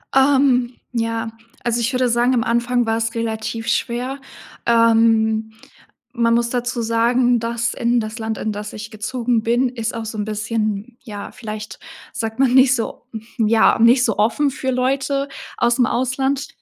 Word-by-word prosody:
Ähm, 265 -3 +3 0.2
ja, 230 -1 -2 0.3
also, 235 0 0
ich 230 - 0
würde 255 0 +2
sagen, 240 +2 +2
am 235 -3 +2
Anfang 240 +1 +1
wars 225 0 -1
relativ 225 0 -3
schwer. 245 +3 -1 0.5
Ähm, 225 -1 +3 0.6
man 235 -1 +2
muss 235 0 +1
dazu 245 -1 -2
sagen, 240 +2 +2
dass 230 0 -2
in 240 +1 +1
das 215 +1 -5
Land, 220 -1 -4
in 215 - -2
das 210 0 -6
ich 215 0 -7
gezogen 230 +1 -1
bin, 240 +3 +2
ist 230 -2 -4
auch 230 -1 -5
so 220 0 -6
ein 210 - -2
bisschen, 215 +1 -3
ja, 205 -4 -8
vielleicht 215 -2 -7 0.3
sagt 225 +1 -4
man 260 -2 +3
nicht 260 -1 +6
so 230 - -5 0.3
ja, 225 0 +4
nicht 240 +2 +5
so 220 -5 0
offen 235 +7 +2
für 265 -1 -3
Leute 275 +2 0 0.3
ausm 240 +1 +2
Ausland. 265 +3 -1
235 Hz, 160 wpm, -20 LUFS, 225-250 Hz, 0.6 s, nicht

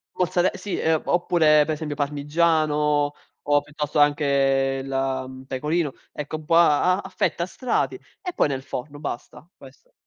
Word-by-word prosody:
mozzare 180 0 +2
sì, 205 - -4
uhm, 160 -1 +1
oppure, 160 -4 +4
per 155 - -1
esempio, 150 -2 -5
parmigiano 150 0 +1 0.3
o, 145 0 +3
piuttosto, 150 0 -4
anche 140 -2 +2
il, - - -8
mhmm, 130 -1 -3
pecorino. 150 +3 -1 0.2
Ecco, 150 +1 -5
un 155 - -10
po' 165 +2 +2
a 170 +2 +5
a - - -5
a - - -9
fette, 185 -2 -1
a - - 0
strati 255 +6 -1 0.3
e 360 -3 -5
poi - - +2
nel 135 -1 -3
forno. 145 +1 -6
Basta, 150 +3 -7
questo. 135 -1 -17
150 Hz, 165 wpm, -24 LUFS, 140-160 Hz, 0.3 s, a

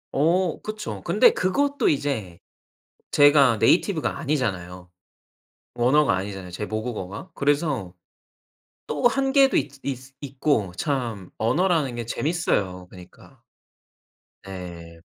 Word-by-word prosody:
어 170 +4 +1
그쵸. 215 0 -6
근데 485 - +5
그것도 285 +10 +1
이제 130 - -2 0.7
제가 145 -5 +5
네이티브가 170 - +2
아니잖아요. 95 - -3 0.9
언어가 135 +3 +3
아니잖아요 95 -1 -5
제 100 +4 -4
모국어가. 110 - -5
그래서 140 - 0 1.0
또 150 +10 +2
한계도 270 +2 +3
있 140 - +1
있 130 0 -6
있고 135 -7 -1
참 120 - -3
언어라는 150 +3 +1
게 120 -1 -5
재밌어요 100 - -1
그니까. 90 -1 -16 1.1
네. 85 -3 -9
130 Hz, 240 characters per minute, -24 LUFS, 95-155 Hz, 1.1 s, 근데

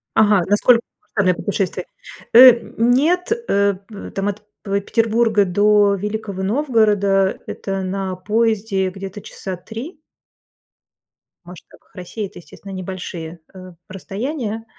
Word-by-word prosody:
Ага, 210 -3 +4
насколько 230 +4 +4 0.4
серьезное 185 -3 +3
путешествие? 190 -3 -2 0.5
Э, 240 0 +9 0.2
нет, 300 - +2 0.2
э, 200 0 +2
п 210 -3 -9
там 195 +1 -2
от 205 +1 -3 0.2
п 200 -1 0
Петербурга 225 -1 +2
до 205 +2 +3
Великого 205 -1 -4
Новгорода- 205 -5 +2
это 195 -1 -4
на 190 0 -3
поезде 210 0 0
где-то 195 +1 -8
часа 190 -1 -7
3. 235 - -9 1.5
В - - -26
масштабах 180 +2 -15
России 190 +3 -6
это, 190 - -11
естественно, 195 +3 -13
небольшие, 180 -3 -7
а, 185 -1 -11 0.2
расстояния. 225 - -5
205 Hz, 120 wpm, -20 LUFS, 190-225 Hz, 1.5 s, Э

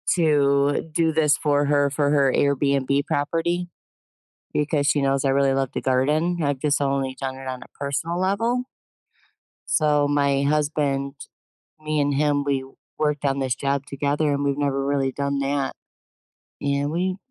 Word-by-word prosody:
to 145 -3 +2
do 160 0 +2
this 155 -2 +3
for 145 -1 +1
her, 145 0 +2
for 145 0 0
her 140 -3 +3
Airbnb 140 0 +1
property, 170 +4 -1 0.9
because 150 -1 +1
she 145 0 +2
knows 135 0 +1
I - - +3
really 135 0 +3
love 135 -1 -1
to - - -3
garden. 150 +7 +1
I've 145 -2 0
just 145 +1 0
only 135 -1 -1
done 135 -1 -3
it 135 0 -10
on 130 -1 -5
a - - -10
personal 160 +5 -2
level 230 +6 0 1.0
so, 150 -2 +2
my 140 -1 +2
husband, 145 -2 0 0.7
me 155 -1 -1
and 145 0 +1
him, 145 0 +1
we 140 -2 -1 0.3
worked 150 -1 0
on 140 0 +1
this 130 -2 0
job 140 +1 -1
together, 145 +2 0
and 140 0 -1
we've 140 0 0
never 140 -1 0
really 140 -1 0
done 140 +1 -2
that, 140 0 -1 0.9
and 140 0 0
we 185 +3 -1
145 Hz, 160 wpm, -23 LUFS, 140-150 Hz, 1.0 s, this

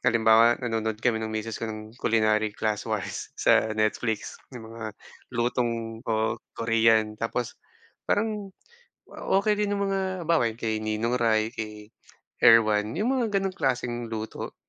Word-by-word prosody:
halimbawa 115 +1 +5
nanonood 110 -2 -1
kami 115 -3 +2
ng 110 - -3
misis 110 +1 -4
ko 115 - -3
ng 110 0 -7
culinary 110 -1 +2
classwise 110 -1 -2
sa - - +4
Netflix 110 0 -1
yung 115 -4 -10
mga 110 -2 -7 0.3
lutong 115 -2 -1
oo 110 0 0 0.2
Korean 115 -1 +3
tapos, 115 +1 -2 0.6
parang 210 -2 0 0.6
okey 200 +2 +1
din 205 -1 -1
yung 200 - 0
mga 195 0 0 0.3
halimbawa 160 -9 +3
kay 110 -2 -2
Ninong 110 +3 0
Ry, 110 0 +2
kay 105 -1 -7 0.4
Erwan, 110 -1 +5
yung 215 +7 0
mga 225 -5 -1
ganong 195 -1 0
klaseng 120 -2 -1
luto. 110 -1 -6
115 Hz, 135 wpm, -26 LUFS, 110-125 Hz, 0.6 s, halimbawa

